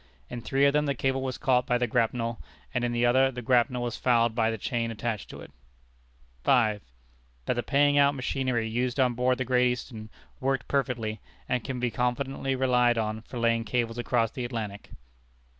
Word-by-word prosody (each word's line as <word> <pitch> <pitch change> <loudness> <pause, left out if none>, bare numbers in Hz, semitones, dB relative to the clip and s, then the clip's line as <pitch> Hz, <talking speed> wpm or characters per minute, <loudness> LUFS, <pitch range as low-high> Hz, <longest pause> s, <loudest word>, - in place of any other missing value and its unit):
In 120 - -5
three 135 +4 +2
of 140 - +4
them 150 0 +2
the 140 - 0
cable 135 +1 0
was 130 -1 -3
caught 125 -3 +2
by 125 - +2
the 125 - +1
grapnel, 115 +1 -1 0.3
and 125 -2 0
in 120 - 0
the 120 0 +1
other 130 +2 +4
the 125 -1 -7
grapnel 125 0 +2
was 120 -2 -3
fouled 120 -2 +2
by 110 -1 +1
the 110 - -2
chain 115 +2 -2
attached 115 -1 -4
to - - -9
it. - - -12 0.9
5. 110 -5 +3 0.6
That - - +1
the 120 - -1
paying 145 +2 +3
out 140 0 +4
machinery 130 -3 -1
used 120 +3 -1
on 125 -2 +3
board 125 +1 +1
the 130 - -2
Great 125 0 +3
Eastern 115 -3 -6 0.3
worked 135 -2 -1
perfectly, 120 -6 -1 0.3
and 125 -2 -1
can 130 -2 -4
be 120 -1 -1
confidently 135 +2 -1
relied 125 -2 +3
on 110 0 -2
for 120 - -9
laying 115 -1 +2
cables 115 +1 -2
across 120 -2 +1
the 125 - -5
Atlantic. 110 -4 -5
125 Hz, 195 wpm, -27 LUFS, 115-130 Hz, 0.9 s, of